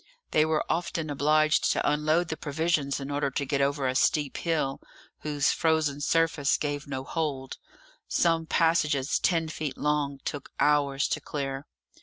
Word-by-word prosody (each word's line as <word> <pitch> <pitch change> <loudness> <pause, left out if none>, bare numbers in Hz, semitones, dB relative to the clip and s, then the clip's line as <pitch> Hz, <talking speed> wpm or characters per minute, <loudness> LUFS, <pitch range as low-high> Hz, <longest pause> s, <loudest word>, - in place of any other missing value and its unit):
They 155 0 +4
were 155 -1 0
often 165 -2 -2
obliged 155 +2 +3
to - - 0
unload 155 +3 +1
the 160 - -2
provisions 150 -2 -1
in 140 +1 -6
order 145 -1 0
to 140 +1 -2
get 140 0 0
over 140 -1 +1
a 130 - 0
steep 145 +1 +1
hill, 155 -5 -1 0.4
whose 145 -2 +1
frozen 155 -3 +1
surface 160 -2 +2
gave 145 -1 -3
no 130 -2 -4
hold. 140 -4 -3 0.5
Some 165 -1 +1
passages 150 -5 +2
ten 165 -3 +1
feet 155 -3 -4
long 150 -2 0
took 145 -2 -5
hours 145 -1 +2
to - - -1
clear. 135 -1 -4
150 Hz, 155 wpm, -27 LUFS, 140-160 Hz, 0.5 s, They